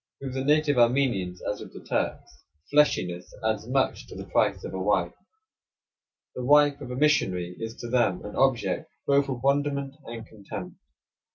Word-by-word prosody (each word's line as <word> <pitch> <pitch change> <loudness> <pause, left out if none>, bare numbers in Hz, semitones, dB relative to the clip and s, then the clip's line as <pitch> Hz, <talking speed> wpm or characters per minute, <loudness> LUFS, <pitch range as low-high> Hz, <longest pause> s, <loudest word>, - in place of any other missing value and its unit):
With 135 -2 -5
the 130 0 -2
native 145 -1 +3
Armenians, 120 -8 +2
as 105 - -2
with - - -10
the - - -10
Turks, - - -3 0.3
fleshiness 90 -12 +2
adds 110 0 0
much 130 +1 0
to - - -11
the - - -7
price - - +1
of - - -6
a 95 - -3
wife. 95 -3 +1 1.2
The 125 - -5
wife 145 +1 +5
of 130 - -7
a 125 - -4
missionary 95 -12 +1
is 115 0 -5
to 120 - -7
them 115 -7 +1
an 105 - -7
object 135 -3 +1 0.2
both 140 0 +3
of 125 -2 -4
wonderment 140 0 +1
and 115 -1 -7
contempt. 105 -3 -9
125 Hz, 170 wpm, -27 LUFS, 105-140 Hz, 1.2 s, wife